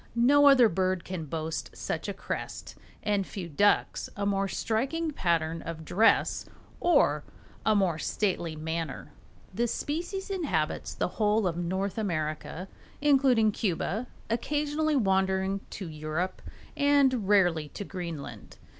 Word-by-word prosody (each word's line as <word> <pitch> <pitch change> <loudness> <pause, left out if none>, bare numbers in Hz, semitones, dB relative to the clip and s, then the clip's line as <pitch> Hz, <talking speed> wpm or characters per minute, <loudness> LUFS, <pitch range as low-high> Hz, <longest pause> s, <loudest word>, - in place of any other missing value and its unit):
No 285 +5 +6
other 260 -4 +8
bird 185 -2 0
can 180 -4 -5
boast 160 +2 -4
such - - -3
a - - -2
crest, - - -5 0.3
and 205 -2 +1
few 190 -2 -6
ducks 200 +6 +2
a 200 - -1
more 195 -1 +1
striking 270 - -1
pattern 165 - 0
of 160 -1 -7
dress 220 +8 +3 0.3
or 345 - +3 0.4
a 215 - +5
more 180 -6 +2
stately 175 -6 -1
manner. 160 +1 -4 0.4
The 240 +1 +1
species 350 - -3
inhabits 185 - -1
the - - 0
whole 210 0 +3
of 175 -2 0
North 190 +4 -2
America, 160 -1 -3 0.3
including 265 -6 +4
Cuba, 205 +4 -2 0.2
occasionally 295 +5 0
wandering 190 -3 +1
to 190 - -6
Europe 155 +4 -3 0.3
and 275 -6 +3
rarely 175 -7 +3
to 205 - -6
Greenland. 170 -7 -7
195 Hz, 130 wpm, -28 LUFS, 170-245 Hz, 0.4 s, other